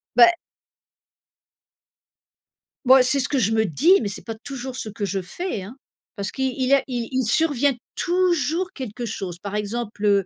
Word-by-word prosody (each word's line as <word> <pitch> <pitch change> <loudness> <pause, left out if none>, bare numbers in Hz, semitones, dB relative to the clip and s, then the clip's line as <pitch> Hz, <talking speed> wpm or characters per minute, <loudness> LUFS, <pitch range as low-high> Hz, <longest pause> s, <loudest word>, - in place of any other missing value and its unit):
Bah. 245 +9 +7 2.5
Bah, 260 +1 +8
c'est 260 +2 +3
ce 255 - +1
que 280 - 0
je 220 -2 +2
me 220 0 +2
dis 320 - +4
mais 210 - -2
c'est 190 - -7
pas 225 -1 -6
toujours 260 +2 -7
ce 225 - -4
que 205 0 -4
je 195 0 -2
fais, 210 - -5
hein. 210 +7 -10 0.4
Parce 200 0 -3
qu'il 265 -1 -2
il 260 -1 -1
y 275 - +3
a 275 - +1
il 240 -3 -3
il 260 -1 0
survient 285 +2 +2 0.2
toujours 355 0 0
quelque 245 -2 -6
chose. 185 -4 -5
Par 200 +2 -6
exemple, 210 0 -3
heu, 200 -2 +3
245 Hz, 180 wpm, -23 LUFS, 210-275 Hz, 2.5 s, Bah